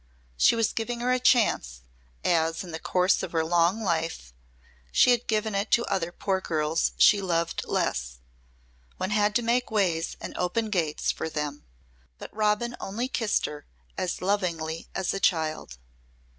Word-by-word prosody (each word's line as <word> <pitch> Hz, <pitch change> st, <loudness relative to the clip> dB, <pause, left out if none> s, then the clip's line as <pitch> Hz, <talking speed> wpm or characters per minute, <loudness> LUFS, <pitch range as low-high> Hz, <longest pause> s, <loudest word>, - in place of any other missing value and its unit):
She -, -, +4 dB
was 230 Hz, -2 st, +1 dB
giving 235 Hz, +1 st, -3 dB
her 250 Hz, +1 st, +1 dB
her 255 Hz, -, +2 dB
chance, 215 Hz, -, +2 dB, 0.4 s
as 165 Hz, +1 st, +1 dB
in 180 Hz, -, -9 dB
the 160 Hz, -, -5 dB
course 180 Hz, +2 st, +2 dB
of -, -, -6 dB
her 160 Hz, -1 st, +1 dB
long 175 Hz, +6 st, +2 dB
life 165 Hz, -, -2 dB, 0.6 s
she 250 Hz, -, +5 dB
had 245 Hz, 0 st, +1 dB
given 220 Hz, -1 st, 0 dB
it 200 Hz, +2 st, -1 dB
to 235 Hz, -, +4 dB
other 175 Hz, -3 st, -1 dB
poor 190 Hz, +1 st, -1 dB
girls 155 Hz, -1 st, 0 dB
she 205 Hz, -1 st, +6 dB
loved 170 Hz, -3 st, -1 dB
less. -, -, -1 dB, 0.8 s
One 185 Hz, -, -3 dB
had 210 Hz, 0 st, +2 dB
to 240 Hz, -, +2 dB
make 245 Hz, +2 st, +1 dB
ways 180 Hz, -7 st, 0 dB
and -, -, -7 dB
open 215 Hz, +5 st, -1 dB
gates 165 Hz, -6 st, 0 dB
for 160 Hz, -, -4 dB
them. 150 Hz, -2 st, -4 dB, 0.5 s
But -, -, -10 dB
Robin 215 Hz, +3 st, +1 dB
only 230 Hz, +6 st, -3 dB
kissed 225 Hz, -5 st, 0 dB
her 150 Hz, -1 st, -7 dB, 0.3 s
as 185 Hz, -1 st, -3 dB
lovingly 170 Hz, -5 st, -1 dB
as 190 Hz, -2 st, -1 dB
a 195 Hz, -, -2 dB
child. 155 Hz, -, 0 dB
185 Hz, 165 wpm, -27 LUFS, 160-220 Hz, 0.8 s, she